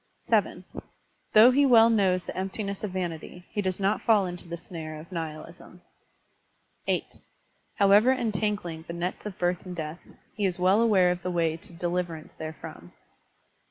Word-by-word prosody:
(7) - - +1 0.7
Though 220 +4 +8
he 280 +3 +4
well 230 -4 +6
knows 190 -4 +2
the - - -7
emptiness 195 +1 -4
of 210 - -1
vanity, 180 -1 -5
he 210 - -1
does 185 -1 -2
not 200 +2 +1
fall 215 -4 +4
into 175 -1 -7
the 170 0 -5
snare 160 -2 -8
of 165 +4 -13
nihilism. 165 +2 -7 1.0
(8) - - -2 0.6
However 205 +4 +5
entangling 210 -8 -1
the 170 - -5
nets 175 +4 -4
of 195 - -8
birth 175 0 0
and 180 -1 -7
death, 160 0 -5 0.4
he 205 -2 +1
is 180 - -2
well 185 +4 +4
aware 195 -6 +4
of 180 0 -3
the 180 - -3
way 165 -2 +1
to 165 - -12
deliverance 175 -2 -3
there 155 0 -7
from. 85 +1 -10
180 Hz, 165 wpm, -27 LUFS, 170-205 Hz, 1.0 s, Though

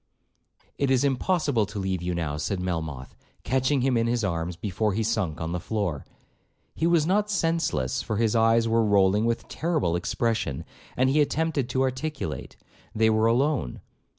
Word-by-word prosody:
'It 140 - +1
is 130 0 +3
impossible 140 - +1
to - - -8
leave 95 -2 -2
you 90 0 -2
now,' 80 -4 -2
said 85 +6 -2
Melmoth, 80 -7 -4 0.3
catching 130 +2 +1
him 130 0 +2
in 115 0 +2
his 120 -1 0
arms 85 -2 -2
before 105 +3 -1
he 110 +3 0
sunk 105 -9 -1
on 80 0 -3
the 90 - -2
floor. 90 -6 -3 0.7
He 165 - 0
was 170 -3 +3
not 205 +4 +1
senseless, 165 - 0
for 110 - -3
his 115 0 +1
eyes 115 0 +4
were 115 0 +3
rolling 100 0 +3
with 115 0 -1
terrible 155 - -1
expression, 110 - -1 0.3
and 130 - +3
he 150 +2 +4
attempted 150 -3 0
to 130 - +1
articulate. 130 - -4 0.4
They 110 0 +3
were 110 +1 +3
alone. 130 - +1
115 Hz, 170 wpm, -26 LUFS, 90-135 Hz, 0.7 s, eyes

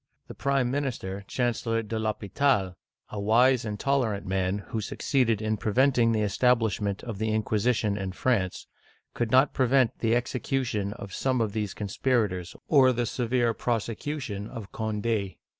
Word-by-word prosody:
The - - -8
prime 135 -3 0
minister, 120 -9 -3
Chancellor 115 -2 -1
de 110 +1 -3
L'Hdpital', 110 -1 0 0.2
— - - -48
a 105 - -4
wise 120 +5 +4
and 105 -1 -4
tolerant 120 -8 0
man, 95 0 0
who 110 - -2
succeeded 115 -1 0
in 110 0 0
preventing 120 +2 +3
the 110 -1 +1
establishment 105 -2 +1
of 110 -5 -6
the 110 0 0
inquisition 110 0 +1
in 95 -1 -3
France, 95 -5 0 0.2
— - - -36
could 120 -2 -1
not 130 +4 +4
prevent 130 -2 +2
the 115 0 +2
execution 120 -4 -1
of 100 -3 -9
some 130 -2 0
of 110 -3 0
these 105 -4 -3
conspirators, 105 -4 -1
or 135 -4 +6
the 120 -1 -1
severe 120 0 0
prosecution 115 -1 -3
of 115 -5 -8
Cond6. 110 -2 -2
115 Hz, 155 wpm, -27 LUFS, 105-125 Hz, 0.2 s, or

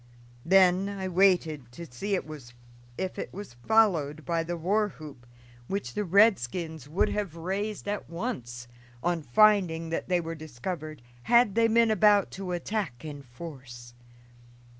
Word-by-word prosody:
Then 190 +1 +4
I 195 -2 -4
waited 170 -8 +2
to 170 +6 -8
see 195 +9 -3
if 120 0 -8
it - - -5
was 200 -8 -9
followed 165 -9 +2
by 170 -1 0
the 170 +1 -4
war 205 +6 +1
whoop, 145 -8 -12 0.4
which 195 -11 -4
the 210 - -1
redskins 170 - +2
would 170 +6 +1
have 200 -6 -3
raised 195 +5 -4
at 205 0 -3
once, 125 - -5 0.4
on 175 -1 0
finding 165 - +3
that 165 - -3
they 180 -1 +3
were 165 -1 -5
discovered, 155 -1 -7 0.3
had 235 -3 +5
they 230 +1 +3
been 230 0 +3
about 210 -1 +4
to 190 -1 -6
attack 175 - -3
in 145 -2 -7
force. 125 -3 -11
170 Hz, 140 wpm, -28 LUFS, 145-200 Hz, 0.4 s, had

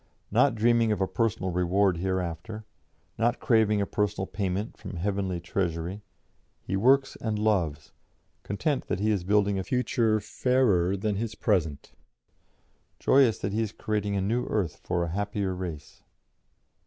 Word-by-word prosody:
Not - - +4
dreaming 115 0 +3
of 105 - 0
a 95 - +1
personal 100 -1 -1
reward 90 +1 +2
hereafter, 95 +3 -3 0.5
not 120 +2 +1
craving 110 -3 +3
a - - +1
personal 105 -1 -1
payment 100 +1 -3
from 100 -3 -8
heavenly 95 0 -1
treasury, 85 +1 -3 0.6
he 95 - -2
works 130 +6 +3
and 110 -2 -2
loves, 95 -9 0 0.5
content 135 - -2
that - - -1
he 110 +2 +2
is 100 -4 0
building 100 +1 +2
a - - -2
future 115 -2 +1
fairer 105 -5 +1
than 105 0 -1
his 110 0 -3
present, 80 -9 -1 1.1
joyous 130 -7 +4
that 100 - -3
he 110 - +1
is 110 -2 -2
creating 105 -2 -2
a 100 - 0
new 115 +6 0
earth 95 -8 -1
for 90 -1 -2
a 85 - -3
happier 100 0 -2
race." 90 -5 -7
100 Hz, 150 wpm, -27 LUFS, 95-110 Hz, 1.1 s, Not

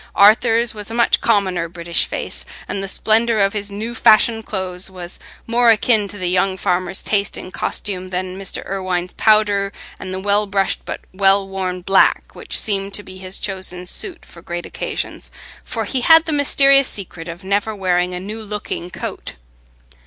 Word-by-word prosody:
Arthur's 225 +3 +5
was 210 -1 -6
a 225 - -4
much 235 - +3
commoner 185 -6 +1
British 170 0 -1
face, - - -4 0.2
and 195 - -3
the 195 - -4
splendour 225 +3 +2
of 195 -1 +2
his 205 -1 -2
new 215 +4 -5
fashioned 225 -1 +4
clothes 185 -2 -3
was 180 -1 -9 0.3
more 235 +1 +3
akin 220 -1 +3
to 205 - -5
the 185 -2 -2
young 185 +1 +1
farmer's 180 +1 0
taste 200 -2 0
in 185 - -8
costume 185 -2 -3
than 185 0 -3
Mr. 195 0 -4
Irwine's 185 -2 -2
powder 205 -2 +3 0.3
and 185 - -7
the 185 - -3
well 205 +2 +1
brushed 195 -1 0
but - - -5
well 195 0 +3
worn 185 -2 -3
black, 195 +2 +2
which - - -2
seemed 195 -1 -1
to 205 - -3
be 185 -1 -12
his 185 0 -4
chosen 185 -2 -3
suit 350 - -3
for 170 - -14
great 175 +1 -5
occasions; - - -5 0.3
for 225 -2 -3
he 255 +5 -1
had 325 +4 +6
the 320 - -2
mysterious 275 -1 +5
secret 180 -4 -5
of 170 +3 -8
never 205 +3 -1
wearing 180 -2 0
a - - -4
new 210 +4 -6
looking 210 -4 -5
coat. - - -6
195 Hz, 180 wpm, -19 LUFS, 185-215 Hz, 0.3 s, had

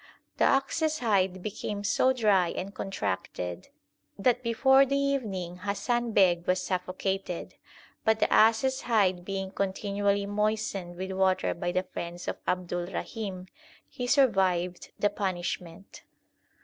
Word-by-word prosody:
The - - +4
ox 275 +4 +2
s 310 -1 +1
hide 190 -6 +1
became 205 -1 -4
so 255 +5 +3
dry 210 -8 +3
and 195 +3 -5
contracted, 95 - -4 0.5
that 245 +4 +2
before 265 +3 +5
the 275 +1 0
evening 215 -11 -2
Hasan 230 +5 -1
Beg 175 -4 +3
was 185 0 +2
suffocated; 185 0 -3 0.5
but 220 0 +3
the - - +2
ass 220 +1 +5
s 265 0 0
hide 195 -6 +2
being 195 0 -4
continually 200 +1 0
moistened 205 -3 -1
with 190 +2 -5
water 190 0 +1
by 175 +1 -3
the 185 +1 0
friends 175 -1 -7
of - - -3
Abdulrahim, 185 +2 -3 0.4
he 245 - -5
survived 190 -10 +2
the 205 - +2
punishment. 180 -2 -4
195 Hz, 130 wpm, -28 LUFS, 180-225 Hz, 0.5 s, before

